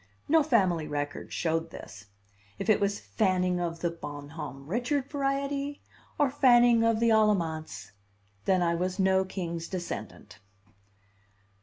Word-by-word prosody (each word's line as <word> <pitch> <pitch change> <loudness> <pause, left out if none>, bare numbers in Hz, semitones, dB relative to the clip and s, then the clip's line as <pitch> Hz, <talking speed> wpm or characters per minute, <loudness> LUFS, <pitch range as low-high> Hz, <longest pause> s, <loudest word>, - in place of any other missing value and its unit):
No 320 +1 +5
family 190 - +2
record 145 0 -4
showed 165 0 -1
this. 110 -8 -11 0.5
If 220 - +1
it 210 - +3
was 200 0 0
Fanning 185 -4 0
of 170 -1 -3
the 170 - 0
Bon 145 -3 -8
Homme 140 -3 -8
Richard 250 - -1
variety, 280 0 -2 0.4
or 285 -3 +2
Fanning 240 -4 +5
of 230 -1 +2
the 230 0 +3
Alamance, 160 - +1 0.5
then 185 -2 +3
I 170 0 +2
was 180 +2 -2
no 190 -1 +3
king's 170 -3 -5
descendant. 110 - -7
185 Hz, 135 wpm, -28 LUFS, 165-235 Hz, 0.5 s, No